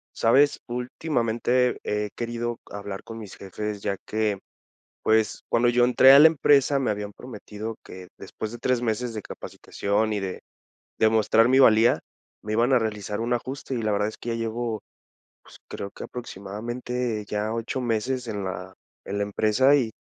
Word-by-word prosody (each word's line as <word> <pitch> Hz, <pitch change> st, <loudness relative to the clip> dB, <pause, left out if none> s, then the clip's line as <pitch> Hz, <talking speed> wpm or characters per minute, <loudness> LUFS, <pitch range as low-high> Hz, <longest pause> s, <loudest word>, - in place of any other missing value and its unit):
¿Sabes? 140 Hz, +5 st, +3 dB
Últimamente 125 Hz, -1 st, 0 dB
he 105 Hz, 0 st, -1 dB
querido 120 Hz, 0 st, -3 dB
hablar 100 Hz, -1 st, -6 dB
con 115 Hz, 0 st, -8 dB
mis 105 Hz, -4 st, -9 dB
jefes, 105 Hz, +1 st, -5 dB
ya 100 Hz, -1 st, -1 dB
que, 105 Hz, -2 st, -1 dB, 0.6 s
pues, 110 Hz, -1 st, +2 dB
cuando 120 Hz, +1 st, +3 dB
yo 120 Hz, 0 st, +3 dB
entré 130 Hz, +2 st, +7 dB
a 140 Hz, -, +9 dB
la 155 Hz, -, +10 dB
empresa, 145 Hz, -3 st, +3 dB
me 130 Hz, -, 0 dB
habían 105 Hz, 0 st, -4 dB
prometido 110 Hz, -1 st, -8 dB
que, 90 Hz, 0 st, -11 dB
después 110 Hz, -, -6 dB
de 120 Hz, -, -7 dB
3 125 Hz, 0 st, 0 dB
meses 120 Hz, +1 st, -1 dB
de 110 Hz, -, -4 dB
capacitación 105 Hz, +2 st, -3 dB
y 105 Hz, -, -1 dB
de 95 Hz, -1 st, -5 dB, 0.6 s
de 110 Hz, -, +5 dB
mostrar 110 Hz, +1 st, +4 dB
mi 130 Hz, +1 st, +4 dB
valía, 115 Hz, -3 st, +6 dB, 0.4 s
me 105 Hz, -, -4 dB
iban 120 Hz, +4 st, +2 dB
a 130 Hz, -, +6 dB
realizar 105 Hz, -2 st, -3 dB
un 120 Hz, +2 st, -1 dB
ajuste. 130 Hz, +2 st, -3 dB
Y -, -, -1 dB
la 110 Hz, -, 0 dB
verdad 105 Hz, 0 st, +1 dB
es 110 Hz, -, -9 dB
que -, -, -8 dB
ya 115 Hz, -, 0 dB
llevo, 115 Hz, -1 st, -3 dB, 0.6 s
pues, -, -, -16 dB
creo 100 Hz, -, -6 dB
que -, -, -9 dB
aproximadamente 120 Hz, +1 st, -4 dB
ya 105 Hz, +1 st, -2 dB
8 115 Hz, +3 st, -3 dB
meses 125 Hz, +1 st, -1 dB
en 105 Hz, -3 st, -3 dB
la 95 Hz, 0 st, -6 dB, 0.3 s
en 100 Hz, -, -3 dB
la -, -, 0 dB
empresa, 110 Hz, +7 st, +3 dB
y 120 Hz, -6 st, 0 dB
115 Hz, 175 wpm, -25 LUFS, 105-125 Hz, 0.6 s, la